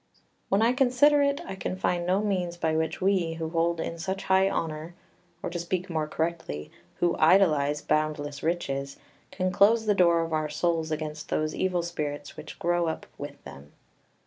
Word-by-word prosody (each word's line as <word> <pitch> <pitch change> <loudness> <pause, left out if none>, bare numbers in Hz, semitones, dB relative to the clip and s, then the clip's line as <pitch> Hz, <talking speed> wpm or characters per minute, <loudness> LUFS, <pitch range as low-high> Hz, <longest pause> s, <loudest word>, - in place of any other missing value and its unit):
] - - -45
7 - - -33 0.3
"When 195 +2 +3
I 235 +2 +4
consider 270 +3 +4
it 280 0 +1
I - - -5
can 190 -1 -4
find 175 -2 -1
no 190 +3 +2
means 180 -4 -1
by 160 -2 0
which 160 +2 -1
we, 185 -4 +2
who 160 -1 -4
hold 165 0 +1
in 165 +1 -4
such 190 +3 -3
high 190 0 +3
honour, 160 0 -4 0.5
or, - - -3
to 175 - -3
speak 180 +2 -3
more 155 -2 -1
correctly, 160 - -3 0.2
who 175 -1 +1
idolise 155 -4 +4
boundless 150 -2 -1
riches, 140 -5 -2 0.3
can 185 -1 -1
close 215 +4 +4
the 210 - +3
door 170 -3 +4
of 165 -1 -4
our 155 -1 0
souls 160 +1 0
against 155 -1 -4
those 155 0 0
evil 180 -2 0
spirits 145 -4 -4
which - - -9
grow 175 0 +1
up 160 - -3
with 145 0 -8
them. 70 +2 -12
170 Hz, 190 wpm, -27 LUFS, 155-185 Hz, 0.5 s, I